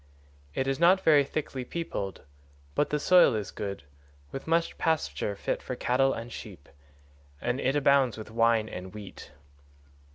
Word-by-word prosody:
135 -, -, -2 dB
It 135 Hz, -, 0 dB
is 135 Hz, +1 st, -1 dB
not 180 Hz, +3 st, +5 dB
very 150 Hz, -3 st, +6 dB
thickly 135 Hz, -2 st, -4 dB
peopled, 125 Hz, -, -5 dB, 0.5 s
but 145 Hz, -, +1 dB
the 150 Hz, -, 0 dB
soil 175 Hz, -6 st, +5 dB
is 105 Hz, -2 st, -3 dB
good, 100 Hz, -6 st, -5 dB, 0.5 s
with 135 Hz, -, -7 dB
much 165 Hz, +1 st, +1 dB
pasture 160 Hz, -10 st, 0 dB
fit -, -, -2 dB
for 125 Hz, -, -5 dB
cattle 130 Hz, +2 st, +2 dB
and 115 Hz, +1 st, -5 dB
sheep, -, -, -10 dB, 0.7 s
and 120 Hz, +6 st, -1 dB
it 135 Hz, +2 st, +1 dB
abounds 140 Hz, -4 st, +3 dB
with 110 Hz, 0 st, -9 dB
wine 115 Hz, -1 st, +3 dB
and 95 Hz, -1 st, -8 dB
wheat. 105 Hz, -2 st, -10 dB
130 Hz, 160 wpm, -28 LUFS, 110-150 Hz, 0.7 s, very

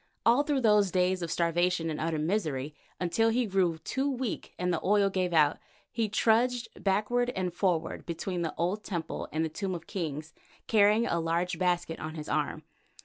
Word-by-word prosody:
All 240 Hz, +4 st, +5 dB
through 290 Hz, -2 st, 0 dB
those 210 Hz, -4 st, +4 dB
days 180 Hz, 0 st, +1 dB
of 170 Hz, -, -3 dB
starvation 170 Hz, 0 st, +1 dB
and 155 Hz, -, -4 dB
utter 165 Hz, 0 st, -1 dB
misery, 155 Hz, -4 st, -1 dB, 0.3 s
until 205 Hz, +6 st, +2 dB
he 240 Hz, +2 st, +1 dB
grew 185 Hz, -5 st, +1 dB
too 265 Hz, -, -2 dB
weak 255 Hz, -5 st, -4 dB
and 180 Hz, 0 st, 0 dB
the 165 Hz, -, -2 dB
oil 200 Hz, 0 st, +3 dB
gave 185 Hz, -2 st, 0 dB
out, 155 Hz, -3 st, +3 dB, 0.3 s
he 225 Hz, -2 st, -1 dB
trudged 235 Hz, +3 st, +2 dB
backward 215 Hz, +5 st, +1 dB
and 180 Hz, -2 st, -2 dB
forward 175 Hz, -3 st, -1 dB
between 175 Hz, +1 st, -3 dB
the 165 Hz, -2 st, -3 dB
old 185 Hz, +5 st, -1 dB
temple 170 Hz, -4 st, -4 dB
and 160 Hz, +1 st, 0 dB
the -, -, 0 dB
Tomb 185 Hz, +3 st, -3 dB
of 165 Hz, -2 st, -8 dB
Kings 160 Hz, -5 st, -5 dB, 0.3 s
carrying 215 Hz, +1 st, +4 dB
a 170 Hz, -, 0 dB
large 170 Hz, +1 st, -1 dB
basket 175 Hz, -2 st, 0 dB
on 155 Hz, +1 st, -6 dB
his 150 Hz, -1 st, -6 dB
arm. -, -, -1 dB
180 Hz, 185 wpm, -29 LUFS, 165-210 Hz, 0.3 s, All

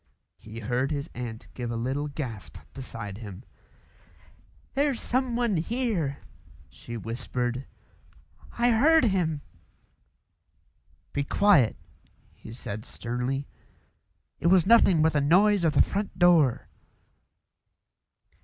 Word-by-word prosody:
He 110 Hz, +2 st, -9 dB
heard 125 Hz, +5 st, -1 dB
his 145 Hz, 0 st, -4 dB
aunt 120 Hz, -2 st, -7 dB
give 120 Hz, -2 st, -5 dB
a 115 Hz, -, -3 dB
little 130 Hz, +5 st, -2 dB
gasp 130 Hz, -8 st, -6 dB, 0.2 s
beside 115 Hz, -6 st, -7 dB
him. 105 Hz, -1 st, -9 dB, 1.3 s
"There's 280 Hz, -2 st, +1 dB
someone 240 Hz, -5 st, 0 dB
here," 175 Hz, -, -1 dB, 0.5 s
she 120 Hz, 0 st, -8 dB
whispered; 120 Hz, +3 st, -3 dB, 0.9 s
"I 240 Hz, +1 st, +3 dB
heard 310 Hz, +8 st, +5 dB
him." 175 Hz, -9 st, +1 dB, 1.7 s
"Be 140 Hz, -, 0 dB
quiet!" 150 Hz, -, +4 dB, 0.6 s
he -, -, -12 dB
said 110 Hz, -2 st, -6 dB
sternly. 125 Hz, +5 st, -3 dB, 0.9 s
"It 170 Hz, -, 0 dB
was 180 Hz, -1 st, +5 dB
nothing 195 Hz, -7 st, +5 dB
but 160 Hz, -, +3 dB
the 150 Hz, -, +2 dB
noise 190 Hz, +6 st, +4 dB
of 160 Hz, -3 st, +2 dB
the 140 Hz, -, +5 dB
front 200 Hz, +1 st, -4 dB
door." 170 Hz, -8 st, +4 dB
145 Hz, 105 wpm, -27 LUFS, 120-200 Hz, 1.7 s, heard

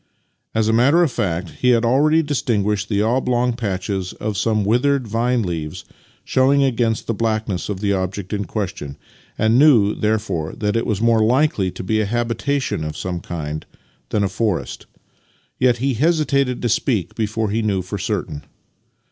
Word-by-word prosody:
As 110 Hz, -1 st, +2 dB
a 110 Hz, -, +2 dB
matter 140 Hz, +9 st, +4 dB
of 160 Hz, -, +1 dB
fact, 90 Hz, -5 st, -2 dB
he 125 Hz, -, +3 dB
had 120 Hz, -1 st, +3 dB
already 150 Hz, +6 st, +3 dB
distinguished 105 Hz, -8 st, -1 dB
the 105 Hz, -1 st, +1 dB
oblong 125 Hz, +1 st, +1 dB
patches 95 Hz, -4 st, -3 dB
of 105 Hz, -1 st, -4 dB
some 105 Hz, +1 st, +1 dB
withered 125 Hz, +4 st, +2 dB
vine 115 Hz, +2 st, 0 dB
leaves 80 Hz, -4 st, -5 dB, 0.4 s
showing 140 Hz, +2 st, +3 dB
against 115 Hz, -4 st, 0 dB
the 115 Hz, -, -1 dB
blackness 110 Hz, -4 st, -2 dB
of 100 Hz, -2 st, -4 dB
the 100 Hz, -1 st, +1 dB
object 95 Hz, +1 st, -3 dB
in 100 Hz, -1 st, -2 dB
question, 90 Hz, -8 st, -5 dB, 0.4 s
and 110 Hz, +3 st, +3 dB
knew, 120 Hz, -9 st, +5 dB
therefore, 105 Hz, -7 st, -1 dB
that 105 Hz, 0 st, -1 dB
it 115 Hz, -, 0 dB
was 105 Hz, -2 st, -1 dB
more 115 Hz, -1 st, +4 dB
likely 120 Hz, -5 st, +2 dB
to 90 Hz, -, -7 dB
be 110 Hz, +3 st, +1 dB
a 105 Hz, -, -1 dB
habitation 120 Hz, -, -1 dB
of 75 Hz, -1 st, -5 dB
some 90 Hz, -1 st, -3 dB
kind 75 Hz, -3 st, -5 dB, 0.4 s
than 105 Hz, -, +1 dB
a -, -, +2 dB
forest; 95 Hz, -1 st, -2 dB, 0.7 s
yet 125 Hz, -2 st, +3 dB
he 135 Hz, +3 st, 0 dB
hesitated 140 Hz, -2 st, +1 dB
to 120 Hz, -, +1 dB
speak 110 Hz, -3 st, 0 dB
before 110 Hz, -1 st, -2 dB
he 115 Hz, +2 st, 0 dB
knew 100 Hz, -4 st, 0 dB
for 100 Hz, +3 st, -5 dB
certain. 90 Hz, -7 st, -3 dB
110 Hz, 170 wpm, -20 LUFS, 100-125 Hz, 0.7 s, knew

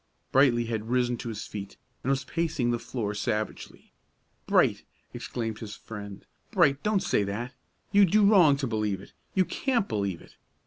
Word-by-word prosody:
Brightly 125 Hz, -3 st, +4 dB
had 110 Hz, -1 st, -3 dB
risen 125 Hz, 0 st, +2 dB
to 120 Hz, -, -5 dB
his 110 Hz, -1 st, -5 dB
feet, 100 Hz, -1 st, -7 dB, 0.2 s
and 130 Hz, -, -3 dB
was 135 Hz, 0 st, +1 dB
pacing 155 Hz, -5 st, -1 dB
the 120 Hz, -, 0 dB
floor 110 Hz, -4 st, -3 dB
savagely. 105 Hz, +1 st, -4 dB, 0.6 s
"Bright," -, -, +3 dB, 0.3 s
exclaimed 115 Hz, -2 st, -4 dB
his 105 Hz, -2 st, -7 dB
friend, 100 Hz, -3 st, -9 dB, 0.2 s
"Bright, 150 Hz, -10 st, +3 dB
don't 210 Hz, -2 st, +1 dB
say -, -, +2 dB
that! 115 Hz, +6 st, -4 dB, 0.4 s
You 200 Hz, 0 st, +7 dB
do 205 Hz, +3 st, +4 dB
wrong 180 Hz, -9 st, +6 dB
to 140 Hz, -, -2 dB
believe 105 Hz, -4 st, -1 dB
it; -, -, -15 dB, 0.2 s
you 190 Hz, -1 st, +4 dB
can't 240 Hz, -3 st, 0 dB
believe 100 Hz, -5 st, -2 dB
it. -, -, -18 dB
120 Hz, 170 wpm, -28 LUFS, 105-155 Hz, 0.6 s, You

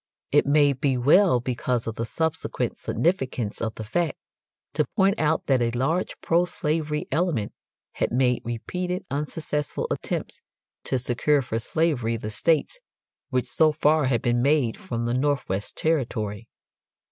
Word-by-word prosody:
It -, -, +4 dB
may 145 Hz, -1 st, +5 dB
be 130 Hz, 0 st, 0 dB
well, 145 Hz, +3 st, +5 dB
because 125 Hz, -1 st, -1 dB
of 115 Hz, -, -3 dB
the 115 Hz, +1 st, -4 dB
subsequent 160 Hz, +4 st, -2 dB
significance 130 Hz, -, -1 dB
of 110 Hz, -1 st, -2 dB
the 110 Hz, -, -6 dB
fact, 165 Hz, +10 st, -1 dB, 0.6 s
to -, -, +1 dB
point 195 Hz, +1 st, +3 dB
out 155 Hz, +1 st, +1 dB
that 130 Hz, -3 st, +2 dB
a 120 Hz, -, +2 dB
large 135 Hz, +10 st, -1 dB
pro 170 Hz, +2 st, +3 dB
slavery 155 Hz, -4 st, -2 dB
element 150 Hz, -, 0 dB, 0.4 s
had -, -, -1 dB
made 125 Hz, 0 st, +2 dB
repeated 180 Hz, +11 st, -3 dB
unsuccessful 150 Hz, 0 st, -2 dB
attempts -, -, -3 dB, 0.4 s
to 130 Hz, -, +1 dB
secure 130 Hz, +4 st, +1 dB
for 115 Hz, -2 st, -2 dB
slavery 125 Hz, -4 st, 0 dB
the 110 Hz, -1 st, -5 dB
states 165 Hz, -, +1 dB, 0.5 s
which 130 Hz, -3 st, 0 dB
so 155 Hz, +5 st, +3 dB
far 150 Hz, 0 st, +3 dB
had 125 Hz, -3 st, +1 dB
been 120 Hz, 0 st, +2 dB
made 140 Hz, -4 st, +2 dB
from 115 Hz, -1 st, -4 dB
the 120 Hz, -, 0 dB
Northwest 130 Hz, -7 st, -1 dB
Territory. 115 Hz, -8 st, -1 dB
135 Hz, 145 wpm, -25 LUFS, 120-160 Hz, 0.6 s, may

